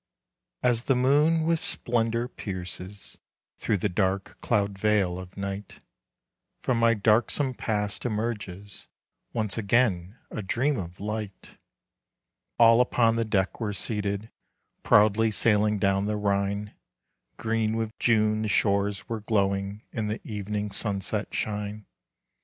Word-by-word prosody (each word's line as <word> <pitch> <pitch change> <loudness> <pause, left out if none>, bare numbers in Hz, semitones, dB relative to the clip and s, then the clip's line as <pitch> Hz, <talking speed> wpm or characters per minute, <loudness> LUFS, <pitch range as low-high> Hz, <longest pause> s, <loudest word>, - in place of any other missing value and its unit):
As 120 -1 +2
the 135 - +3
moon 150 +6 +3
with 165 0 +1
splendor 115 0 -1
pierces 95 -2 -5 0.4
Through 105 - +1
the 100 - 0
dark 95 0 -1
cloud 100 -1 +1
veil 100 -4 +2
of 95 +1 -11
night, 100 0 -5 0.8
From 125 -3 +1
my 115 0 +4
darksome 115 +6 +2
Past 105 -4 -2
emerges 105 -4 -4 0.4
Once 110 -2 -1
again 100 -3 +1
a 110 - -4
dream 125 +7 0
of 90 -1 -7
light. 105 -1 -6 1.0
All 115 0 +7
upon 115 -2 +3
the 115 0 0
deck 100 -3 0
were 105 -3 -2
seated, 100 +1 -2 0.5
Proudly 110 +2 +4
sailing 105 -1 +2
down 100 0 +1
the 105 0 -1
Rhine. 100 0 -1 0.6
Green 110 -1 0
with 110 -1 -2
June 110 -2 +3
the 110 - -1
shores 100 -1 +1
were 115 -2 -4
glowing 100 -1 0
In 110 -3 -2
the 105 +1 -3
evening's 105 -1 -3
sunset 105 0 -2
shine. 105 0 -3
105 Hz, 125 wpm, -27 LUFS, 100-115 Hz, 1.0 s, All